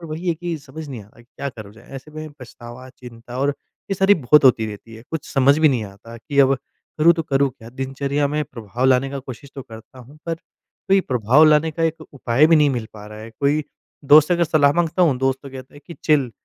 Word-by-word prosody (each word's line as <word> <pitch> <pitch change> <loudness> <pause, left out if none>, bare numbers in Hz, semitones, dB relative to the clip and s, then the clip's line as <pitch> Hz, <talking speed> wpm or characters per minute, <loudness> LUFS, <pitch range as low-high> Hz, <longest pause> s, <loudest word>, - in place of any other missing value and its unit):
और 165 - -9
वही 170 +3 -4
है 170 - +1
कि 170 0 -5
समझ 145 +2 -10
नहीं 125 -6 -7
आता 105 - -21
क्या 140 +3 -7
करा 110 -5 -11
जाए? 110 +3 -18
ऐसे 135 +3 -12
में 155 0 -8
पछतावा, 120 +1 -11
चिंता 120 -1 -11
और 140 +2 +1 0.4
ये - - +1
सारी 195 +2 +4
बहुत 150 -2 +3
होती 115 -4 +4
रहती 110 +2 -10
है। 110 - -12
कुछ 160 -2 -5
समझ 140 +2 +4
भी 155 -1 +5
नहीं 125 -5 -1
आता 105 +4 -12
कि 140 +4 -5
अब 135 0 +4 0.4
करूँ 165 +2 +6
तो 165 - -3
करूँ 140 -2 +1
क्या? 115 -1 -15
दिनचर्या 135 +3 -2
में 150 +1 -1
प्रभाव 120 -1 -6
लाने 130 +1 +2
का 140 - -5
कोशिश 135 +1 -10
तो 135 - -7
करता 115 +3 -14
हूँ 135 +5 -15
पर 165 - -1
कोई 190 +3 -3
प्रभाव 125 - +3
लाने 155 +1 +4
का 165 +2 -4
एक 165 0 -2
उपाय 130 +1 +2
भी 165 0 +5
नहीं 150 -1 +4
मिल 120 -4 -3
पा 105 -1 -11
रहा 105 0 -11
है। 110 +1 -10
कोई 145 +2 +1 0.4
दोस्त 150 +4 +6
अगर 170 -1 +2
सलाह 150 -3 +3
माँगता 175 +2 0
हूँ 150 -7 +3
दोस्त 135 0 0
तो 140 - -10
कहता 130 0 -11
है 145 - -14
कि 170 - -9
चिल। 140 -6 +2
135 Hz, 240 wpm, -20 LUFS, 120-155 Hz, 0.4 s, करूँ